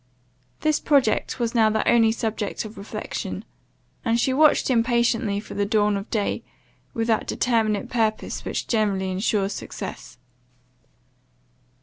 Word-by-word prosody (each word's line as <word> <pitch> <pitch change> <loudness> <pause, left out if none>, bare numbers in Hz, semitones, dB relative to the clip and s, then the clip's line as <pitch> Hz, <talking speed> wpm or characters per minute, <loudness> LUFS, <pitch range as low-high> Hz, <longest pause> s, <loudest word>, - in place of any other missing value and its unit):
This 310 -1 +2
project 265 -5 +2
was 235 -1 -1
now 225 -2 +4
the 220 0 0
only 225 -2 +5
subject 220 -2 -3
of 215 +1 -9
reflection; 200 - -5 0.6
and 230 -1 +1
she 260 - +2
watched 305 +2 +4
impatiently 235 -3 +2
for 210 - -9
the 205 - 0
dawn 210 0 +2
of 200 +1 -5
day, 210 -3 -1 0.5
with 225 - 0
that 225 -2 +1
determinate 225 -3 +1
purpose 225 -3 -1
which - - -3
generally 200 -4 0
insures 195 +1 0
success. - - -7
220 Hz, 130 wpm, -24 LUFS, 210-235 Hz, 0.6 s, only